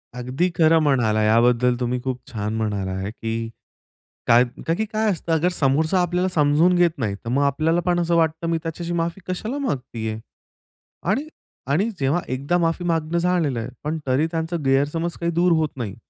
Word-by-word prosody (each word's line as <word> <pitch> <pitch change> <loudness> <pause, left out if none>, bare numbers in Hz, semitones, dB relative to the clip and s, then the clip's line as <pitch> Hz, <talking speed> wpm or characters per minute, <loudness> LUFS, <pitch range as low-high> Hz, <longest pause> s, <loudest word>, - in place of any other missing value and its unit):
अगदी 130 +9 -1
खरं 160 0 +5
म्हणाला 120 -7 +2
आहे, 105 - +2
याबद्दल 120 +2 +3
तुम्ही 125 0 -1
खूप 130 -1 -3
छान 105 -1 -3
म्हणाला 100 -4 -2
आहे 95 +2 -4
की 115 0 -4 0.8
काय 120 +2 +6
कारण 160 +7 -3
की 220 - 0
काय 215 0 0
असतं 165 -1 0
समोरचा 155 +5 +2
आपल्याला 180 +1 0
समजून 155 +4 +4
घेत 175 -2 +4
नाही, 105 -6 -2
तर 115 - -8
मग 140 +3 +2
आपल्याला 155 +5 +1
पण 175 -1 +2
असं 170 0 +1
वाटतं 160 0 +1
मी 165 - +1
त्याच्याशी 170 +1 -4
माफी 170 +2 -2
कशाला 220 +9 -3
मागत 135 - -3
आहे? 110 -1 -3 0.9
आणि-आणि 210 - -2
जेव्हा 140 +6 +1
एकदा 140 +7 0
माफी 165 +1 0
मागणं 165 0 0
झालेलं 170 -8 +1
आहे 115 +3 -5
पण 155 +2 -2
तरी 135 +5 +2
त्यांचा 165 +1 -2
गैरसमज 145 +6 +1
काही 170 0 0
दूर 175 +1 +2
होत 160 -2 +1
नाही. 105 -5 -4
155 Hz, 180 wpm, -22 LUFS, 125-170 Hz, 0.9 s, काय